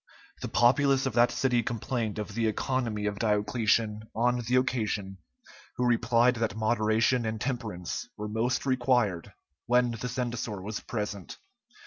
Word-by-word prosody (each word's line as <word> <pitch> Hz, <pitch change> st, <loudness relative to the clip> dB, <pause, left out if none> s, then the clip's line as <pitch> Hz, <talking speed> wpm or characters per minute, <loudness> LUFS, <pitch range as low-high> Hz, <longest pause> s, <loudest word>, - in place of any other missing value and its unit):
The -, -, -3 dB
populace 135 Hz, +3 st, +3 dB
of 135 Hz, -, -1 dB
that 120 Hz, +1 st, +5 dB
city 125 Hz, -3 st, +1 dB
complained 115 Hz, -1 st, -3 dB
of 105 Hz, -1 st, -5 dB
the 115 Hz, +1 st, 0 dB
economy 115 Hz, -2 st, -1 dB
of 105 Hz, -1 st, -2 dB
Diocletian 110 Hz, 0 st, +1 dB
on 120 Hz, +2 st, +2 dB
the 125 Hz, -, +2 dB
occasion, 105 Hz, -6 st, -1 dB, 0.6 s
who 125 Hz, -, 0 dB
replied 120 Hz, +1 st, +3 dB
that 110 Hz, -3 st, -1 dB
moderation 110 Hz, +2 st, +2 dB
and 110 Hz, 0 st, -3 dB
temperance 110 Hz, -8 st, -4 dB
were 105 Hz, -, -4 dB
most 115 Hz, +5 st, -1 dB
required 120 Hz, -9 st, +1 dB, 0.4 s
when 125 Hz, 0 st, +3 dB
the 115 Hz, +2 st, -4 dB
censor 120 Hz, -4 st, -3 dB
was 105 Hz, +3 st, -5 dB
present. 105 Hz, -4 st, -5 dB
115 Hz, 140 wpm, -28 LUFS, 105-125 Hz, 0.6 s, that